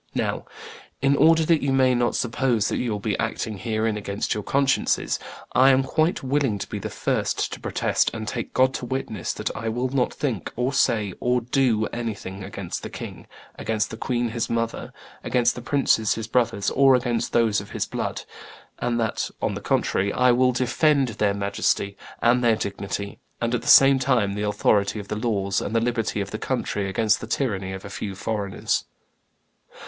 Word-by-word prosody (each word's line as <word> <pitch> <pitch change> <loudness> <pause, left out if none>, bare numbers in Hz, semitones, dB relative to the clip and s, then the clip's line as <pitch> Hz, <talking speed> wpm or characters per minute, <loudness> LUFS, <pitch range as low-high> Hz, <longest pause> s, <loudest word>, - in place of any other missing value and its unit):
Now, - - -1 0.6
in 140 +1 +4
order 160 +2 +5
that 165 -1 +3
you 140 - 0
may 130 -1 +4
not 120 -1 +1
suppose 120 -3 +1
that - - -1
you 120 -2 -1
will 105 - -1
be - - -1
acting 105 -3 -2
herein 110 -1 -1
against 100 -1 -2
your 105 - -3
consciences, 140 +5 +1 0.3
I 130 +1 +6
am 135 0 +4
quite 155 +4 0
willing 135 -5 +1
to - - -4
be - - -5
the - - -5
first - - -1
to - - -7
protest - - +1
and 110 -1 -6
take - - -4
God 130 +1 +4
to 125 - -4
witness 115 -7 -3
that - - -4
I 110 +2 -3
will 120 +3 -1
not 130 -1 +1
think, 130 -9 -3
or 125 +3 -1
say, 110 -8 +2
or 125 0 +2
do 120 -2 +1
anything 100 -5 -5
against 100 -3 -5
the - - -6
king, - - -8 0.3
against 110 -1 -1
the - - -5
queen 120 0 -1
his 115 0 -2
mother, 115 0 -2 0.3
against 120 -1 +2
the 125 - -8
princes 120 -4 +2
his 110 -1 -5
brothers, 115 -4 +1
or 135 -1 +5
against 120 -2 -1
those 110 -4 +2
of 100 - -12
his - - -2
blood; - - -4 0.6
and 120 -1 0
that, 110 -2 -1
on - - -1
the - - -5
contrary, 100 +2 +1
I 125 0 +4
will 125 +1 +4
defend 130 +3 +2
their 105 -2 0
majesty 100 0 0 0.3
and 125 +1 +4
their 115 -2 +4
dignity, 100 0 -4 0.2
and, 115 0 -1
at 125 - 0
the - - -9
same 135 0 +8
time, 125 -6 +1
the 105 +1 -2
authority 105 0 +2
of 100 -1 -7
the 105 - -2
laws 100 -3 0
and 110 - -4
the - - +5
liberty 115 -3 -1
of 100 - -5
the 110 - -4
country 105 -7 -2
against 110 +2 +1
the 110 - -6
tyranny 100 -6 -1
of 95 0 -7
a - - -7
few 100 -1 -5
foreigners. 100 -1 -2
115 Hz, 195 wpm, -24 LUFS, 105-130 Hz, 0.6 s, same